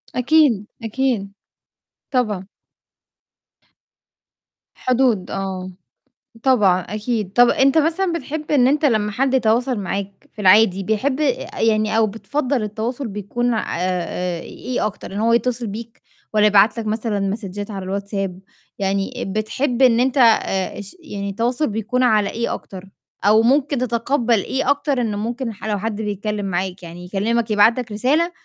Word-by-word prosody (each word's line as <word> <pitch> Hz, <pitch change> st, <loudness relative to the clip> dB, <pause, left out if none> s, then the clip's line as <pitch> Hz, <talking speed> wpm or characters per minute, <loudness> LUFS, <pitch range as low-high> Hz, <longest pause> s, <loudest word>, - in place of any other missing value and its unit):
أكيد، 250 Hz, -5 st, +3 dB, 0.2 s
أكيد. 225 Hz, -3 st, -1 dB, 0.8 s
طبعًا. 210 Hz, -7 st, 0 dB, 2.3 s
حدود 250 Hz, -6 st, +1 dB
آه. 185 Hz, -1 st, -4 dB, 0.7 s
طبعًا، 205 Hz, -9 st, +4 dB
أكيد. 210 Hz, +1 st, -3 dB
طَب 245 Hz, 0 st, +6 dB
أنت 275 Hz, +3 st, +3 dB
مثلًا 335 Hz, +3 st, +1 dB
بتحب 305 Hz, 0 st, -5 dB
إن 255 Hz, -4 st, +4 dB
أنت 295 Hz, +2 st, +2 dB
لمّا 215 Hz, -5 st, +2 dB
حد 265 Hz, +4 st, 0 dB
يتواصل 245 Hz, 0 st, +2 dB
معاك 195 Hz, +1 st, -3 dB, 0.2 s
في 210 Hz, -, -6 dB
العادي، 195 Hz, 0 st, +5 dB
بيحب 260 Hz, +7 st, 0 dB
آآ -, -, -1 dB
يعني 215 Hz, -1 st, +2 dB
أو 225 Hz, -1 st, +4 dB
بتفضّل 255 Hz, +3 st, -2 dB
التواصل 225 Hz, +5 st, -3 dB
بيكون 215 Hz, +4 st, -2 dB
آآ 180 Hz, -3 st, -2 dB
إيه 250 Hz, -4 st, -4 dB
أكتر؟ 210 Hz, -2 st, -6 dB
إن -, -, -4 dB
هو 230 Hz, +2 st, +2 dB
يتّصل 235 Hz, 0 st, 0 dB
بيك 225 Hz, +3 st, -8 dB, 0.3 s
والّا 210 Hz, 0 st, +5 dB
يبعت 210 Hz, +3 st, +4 dB
لك 220 Hz, -, -4 dB
مثلًا 215 Hz, -1 st, -1 dB
مسدجات 200 Hz, +1 st, -4 dB
على 195 Hz, -2 st, -5 dB
الWhatsApp؟ 195 Hz, -1 st, -3 dB, 0.5 s
يعني 195 Hz, +4 st, -1 dB, 0.2 s
بتحب 245 Hz, +4 st, -1 dB
إن 240 Hz, -2 st, +5 dB
أنت 265 Hz, +2 st, +1 dB
آآ 215 Hz, -6 st, +3 dB
اش 200 Hz, -, -9 dB
يعني 200 Hz, -11 st, -6 dB
التواصل 240 Hz, +8 st, 0 dB
بيكون 225 Hz, +4 st, -1 dB
على 215 Hz, -4 st, +3 dB
إيه 235 Hz, +1 st, -2 dB
أكتر؟ 190 Hz, 0 st, -9 dB, 0.3 s
أو 215 Hz, +2 st, +5 dB
ممكن 275 Hz, +4 st, +2 dB
تتقبّل 235 Hz, -2 st, +1 dB
إيه 265 Hz, 0 st, -1 dB
أكتر 285 Hz, -2 st, +1 dB
إنه 210 Hz, -3 st, -2 dB
ممكن 235 Hz, +2 st, -3 dB
ح 210 Hz, -, -11 dB
لو 210 Hz, -1 st, 0 dB
حد 220 Hz, 0 st, -3 dB
بيتكلِّم 210 Hz, 0 st, -3 dB
معاك 185 Hz, 0 st, -3 dB
يعني 175 Hz, +1 st, -9 dB
يكلِّمك 220 Hz, +4 st, -1 dB
يبعت 215 Hz, +4 st, +4 dB
لك 240 Hz, -3 st, -6 dB
رسالة 285 Hz, +11 st, +1 dB
220 Hz, 145 wpm, -20 LUFS, 200-255 Hz, 2.3 s, طَب